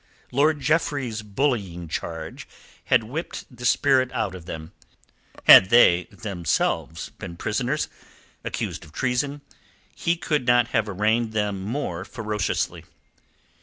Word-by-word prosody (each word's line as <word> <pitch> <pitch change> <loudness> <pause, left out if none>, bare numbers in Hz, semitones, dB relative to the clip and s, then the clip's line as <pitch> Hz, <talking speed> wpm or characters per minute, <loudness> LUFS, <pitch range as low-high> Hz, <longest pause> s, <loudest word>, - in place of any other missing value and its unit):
Lord 145 +3 +2
Jeffreys's 140 -6 0
bullying 105 - -2
charge 80 0 -6 0.4
had - - +3
whipped 130 +1 -6
the 120 +1 -7
spirit 130 -2 +3
out 105 -4 -1
of 90 -2 -10
them. 80 -1 -7 0.7
Had 95 - +9
they, 90 -7 +6
themselves, 85 -5 -2
been 85 -2 -7
prisoners 125 - -1 0.6
accused - - -4
of 75 - -16
treason, 135 - -1 0.5
he 170 - 0
could 150 -6 -1
not 120 -1 +4
have 110 -3 0
arraigned 110 +3 +1
them 105 -3 -1
more 100 -5 -3
ferociously. 105 -1 -2
110 Hz, 120 wpm, -24 LUFS, 95-130 Hz, 0.7 s, Had